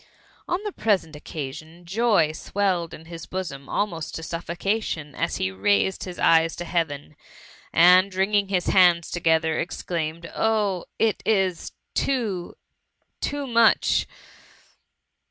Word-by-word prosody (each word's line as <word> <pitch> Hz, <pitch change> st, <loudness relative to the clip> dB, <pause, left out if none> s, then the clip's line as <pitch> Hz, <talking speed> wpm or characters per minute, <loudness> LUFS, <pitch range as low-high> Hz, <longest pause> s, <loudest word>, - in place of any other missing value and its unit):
On 355 Hz, -, +1 dB
the 420 Hz, -, -3 dB
present 195 Hz, -, 0 dB
occasion, 155 Hz, +3 st, -8 dB
joy 195 Hz, -4 st, +2 dB
swelled 180 Hz, 0 st, -1 dB
in 160 Hz, -, -11 dB
his 165 Hz, -1 st, -9 dB
bosom 150 Hz, -8 st, -5 dB
almost 170 Hz, -7 st, -2 dB
to 165 Hz, -, -6 dB
suffi>cation, 170 Hz, -1 st, -3 dB
as 170 Hz, +2 st, -2 dB
he 95 Hz, -, -1 dB
raised 100 Hz, -, +1 dB
his 180 Hz, -2 st, -7 dB
eyes 165 Hz, 0 st, +4 dB
to 175 Hz, -, -6 dB
Heaven, 155 Hz, -4 st, -2 dB, 0.6 s
and, 180 Hz, +4 st, +6 dB
wringing 200 Hz, +1 st, +2 dB
his 185 Hz, -2 st, 0 dB
handa 175 Hz, -3 st, +4 dB
together, 160 Hz, -2 st, +1 dB
exclaimed, 170 Hz, -1 st, -3 dB
*' -, -, -14 dB
Oh! 210 Hz, -5 st, +1 dB
it 225 Hz, -2 st, +1 dB
is 190 Hz, -5 st, 0 dB, 0.2 s
too 220 Hz, -10 st, -1 dB, 0.3 s
« -, -, -50 dB
too 285 Hz, -1 st, -2 dB
much 235 Hz, -3 st, +3 dB
175 Hz, 130 wpm, -24 LUFS, 160-200 Hz, 0.6 s, and